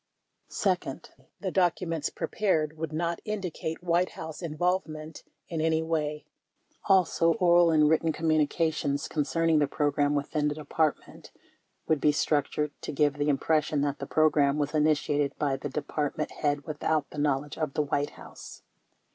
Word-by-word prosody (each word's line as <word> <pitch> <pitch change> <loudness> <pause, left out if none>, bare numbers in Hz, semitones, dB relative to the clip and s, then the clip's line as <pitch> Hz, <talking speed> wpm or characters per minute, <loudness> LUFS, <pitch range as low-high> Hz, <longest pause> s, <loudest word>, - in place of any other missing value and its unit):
Second, 180 -9 -2 0.3
the 190 - -2
documents 170 -4 0
prepared 160 -7 -1
would 160 -1 -4
not 170 +2 -2
indicate 180 -6 -4
White 175 +1 +1
House 160 +1 -7
involvement 160 -1 -2 0.3
in 165 -3 -3
any 160 0 +1
way. 150 -2 -2 0.6
Also, 180 -3 +3
oral 175 -4 +5
and 155 -2 +4
written 160 +1 +2
com 165 +1 -5
munications 155 -1 +1
concerning 160 +1 +1
the 145 - +2
program 145 0 +1
within 150 +1 0
the 145 - -1
Department 155 0 -2 0.6
would 155 -3 +1
be 150 - +5
structured 150 0 0
to - - -5
give 145 0 +1
the 145 +1 +1
impression 150 +1 +1
that 145 -1 -1
the - - -5
program 150 -2 +3
was 150 0 -1
initiated 150 -2 +1
by 140 -2 0
the 145 - -5
Department 150 +1 -3
head 145 -1 -1
without 155 -1 -1
the 150 - -6
knowledge 145 0 0
of 155 -3 -2
the 150 - +2
White 145 0 -1
House. - - -12
155 Hz, 150 wpm, -28 LUFS, 145-165 Hz, 0.6 s, oral